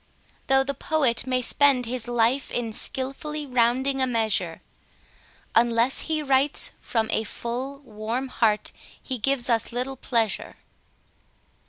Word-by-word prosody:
Though 270 0 +4
the 280 +1 -2
poet 265 -6 +1
may 255 -1 0
spend 275 -1 +4
his 240 0 -3
life 240 +3 +1
in 230 -2 -3
skilfully 285 +6 -3
rounding 260 +2 +1
a 260 - +3
measure, 215 -8 0 0.9
Unless 235 +2 +3
he 310 -1 0
writes 275 +1 +2
from 225 -2 -1
a 220 - +1
full, 245 +6 -4
warm 230 +2 -4
heart 215 -4 +1 0.3
he 260 -2 -5
gives 270 +1 +2
us 230 -2 +1
little 250 +3 -2
pleasure. 230 -5 -1
250 Hz, 130 wpm, -25 LUFS, 230-270 Hz, 0.9 s, Though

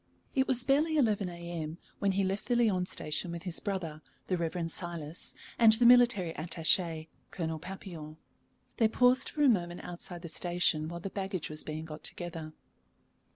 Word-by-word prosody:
It 265 -2 +2
was 250 -2 +5
barely 305 +4 +2
11 210 -8 +2
A.M. 170 -2 -6 0.2
when 200 -1 +1
he 195 +1 +1
left 195 +2 -2
the 245 - +2
Lyons 200 -6 +2
Station 155 +3 -2
with 170 -1 -6
his 180 -3 0
brother, 170 -6 -4 0.2
the 185 - 0
Reverend 170 0 -2
Silas, 170 -2 -3 0.2
and 225 -2 +8
the 235 +2 +4
military 235 -8 +6
attaché, 165 0 +1 0.2
Colonel 160 -3 -3
Papillon. 165 -4 -8 0.6
They 225 - +4
paused 250 +3 +3
for 295 - -1
a - - +6
moment 175 -7 +1
outside 175 0 -7
the - - -5
station 175 -2 0
while 170 0 -6
the 195 - -5
baggage 190 -5 -4
was 155 - 0
being 155 +1 -5
got 155 -1 -9
together. 165 -3 -5
175 Hz, 170 wpm, -31 LUFS, 165-205 Hz, 0.6 s, and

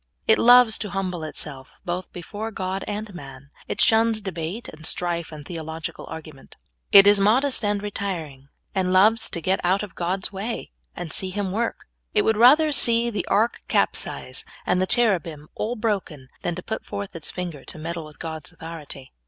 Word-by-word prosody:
It 220 - +5
loves 245 -2 +7
to 210 - -3
humble 185 -4 -3
itself, 145 -3 -6
both 180 +1 -4
before 205 +5 -6
God 190 -2 -3
and 210 0 -4
man. 140 -4 -11 0.2
It - - -4
shuns 225 0 +4
debate 190 +2 -5
and 155 +1 -11
strife, 170 0 -1
and 150 -2 -9
theological 160 -1 -6
argument. 155 -4 -10 0.4
It 195 0 +10
is 205 0 +6
modest 245 +6 +3
and 205 -1 0
retiring, 165 -10 -4 0.3
and 185 -1 0
loves 215 +5 +4
to - - -4
get 190 +3 0
out 190 +3 +2
of 205 -5 -8
God's 185 +3 -2
way, 215 +5 -4 0.2
and 175 -3 -5
see 190 - 0
Him 195 0 -2
w^ork. 230 +4 -1 0.4
It - - +4
w^ould 220 - +3
rather 295 +7 +6
see 235 -3 +3
the 210 - -3
ark 225 +3 +1
capsize, - - 0 0.2
and 180 0 +2
the 185 - +1
cherubim 170 -11 +1
all 235 +3 -2
broken, 195 - -3
than 175 - -2
to 180 - -7
put 220 - -4
forth 200 -2 -6
its 165 - -4
finger 175 -6 -5
to - - -5
meddle 165 +1 -5
with 155 0 -12
God's 160 -2 -6
authority. 155 -5 -9
185 Hz, 180 wpm, -24 LUFS, 165-215 Hz, 0.4 s, It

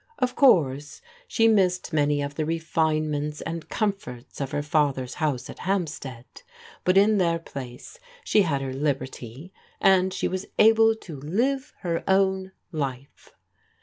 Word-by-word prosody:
Of 250 -1 0
course, 145 - +3 0.3
she 225 - +3
missed 185 -5 +2
many 145 -1 +2
of 140 0 -4
the 155 - -2
refinements 155 -2 -1
and 165 0 -5
comforts 195 - -3
of 135 - -2
her 145 - -2
father's 145 -4 0
house 140 -6 -2
at - - -10
Hampstead, 155 -10 -3 0.6
but 185 +1 +3
in 205 +1 +5
their 170 -2 +2
place 135 - -9 0.2
she 210 - +3
had 140 -7 0
her 130 -1 -4
liberty 135 +2 -4 0.3
and 190 -1 +4
she - - -1
was 185 +1 -4
able 225 0 +6
to 160 -9 -10
live 255 - -1
her 170 -2 -2
own 190 0 +2 0.2
life. 140 -4 -6
160 Hz, 145 wpm, -25 LUFS, 140-190 Hz, 0.6 s, able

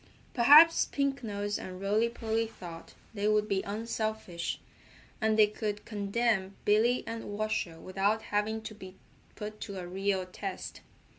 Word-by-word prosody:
Perhaps 295 +7 +8
Pink 275 -1 -1
Nose 205 -1 -2
and 185 0 -7
Rolly 210 +4 +2
Polly 225 -1 -1
thought 170 -6 -10 0.2
they 205 -1 -1
would 210 0 +3
be 195 -2 +1
unselfish, 215 -4 -3 0.6
and 220 0 +2
they 215 - +8
could 210 0 -4
condemn 205 -1 0
Billy 225 +4 +3
and 230 0 -5
Washer 205 -5 -2
without 200 +4 0
having 220 +2 -1
to 220 - -6
be 190 -2 -11 0.4
put 210 0 -7
to 200 -2 -6
a 180 - -5
real 190 +1 -1
test. 185 - -6
210 Hz, 145 wpm, -30 LUFS, 195-225 Hz, 0.6 s, Perhaps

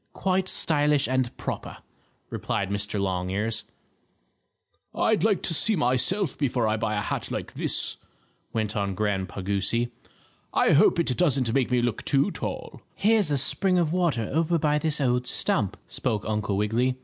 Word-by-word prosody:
"Quite 190 0 0
stylish 150 -4 +2
and 130 -1 -1
proper," - - -5 0.5
replied 100 0 -2
Mr. 100 0 -2
Longears. 95 +3 -2 1.3
"I'd 220 -1 +2
like 210 -3 +2
to 165 - +1
see 215 +7 +3
myself 145 +5 +1
before 125 -5 +1
I 110 - +1
buy 110 -1 -1
a 105 - 0
hat - - -3
like - - -5
this," - - 0 0.5
went 110 -2 -2
on 100 -2 -1
Grandpa 100 -2 -2
Goosey. 100 +5 0 0.6
"I - - +4
hope - - +5
it 135 -7 +1
doesn't 135 -9 +2
make 135 -2 +1
me 125 -1 +1
look 120 -4 -1
too 140 +8 +2
tall." - - -6
"Here's 215 -3 +3
a 145 - +1
spring 180 +7 +2
of 165 -2 +1
water 165 -12 0
over 165 +2 +2
by 150 -1 +1
this 150 0 0
old 125 -2 +1
stump," 115 - 0
spoke 110 -5 -3
Uncle 105 -2 -1
Wiggily. 115 +5 +1
125 Hz, 160 wpm, -26 LUFS, 105-160 Hz, 1.3 s, hope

